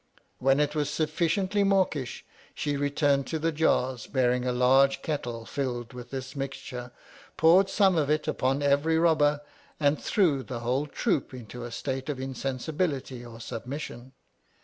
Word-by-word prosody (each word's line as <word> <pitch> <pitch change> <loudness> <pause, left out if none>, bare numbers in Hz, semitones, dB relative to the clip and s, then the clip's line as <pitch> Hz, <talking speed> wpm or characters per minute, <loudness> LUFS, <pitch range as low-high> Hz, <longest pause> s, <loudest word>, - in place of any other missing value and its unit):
When 135 +2 +3
it 150 0 +1
was 150 -2 0
sufficiently 170 +6 +1
mawkish, 185 - 0 0.3
she 145 -1 -1
returned 140 -1 +1
to 160 - -2
the 165 +1 0
jars, 130 -6 +1
bearing 125 -2 +1
a - - +2
large 130 +2 +4
kettle 120 -7 -3
filled 125 -4 -3
with 125 -1 -9
this 130 0 -6
mixture, 130 -3 -5 0.5
poured 180 +4 +5
some 195 -4 +3
of 145 -2 0
it 155 0 +1
upon 135 +2 0
every 145 +3 +3
robber, 150 -3 +3 0.4
and 145 0 +2
threw 170 - +2
the 125 -2 -6
whole 130 +5 0
troop 150 - -1
into 120 0 -8
a 120 - -7
state 130 +2 -4
of 140 -3 -3
insensibility 135 0 -3
or 120 -1 -10
submis 115 +1 -7
mission. 130 -2 -6
140 Hz, 155 wpm, -28 LUFS, 125-155 Hz, 0.5 s, poured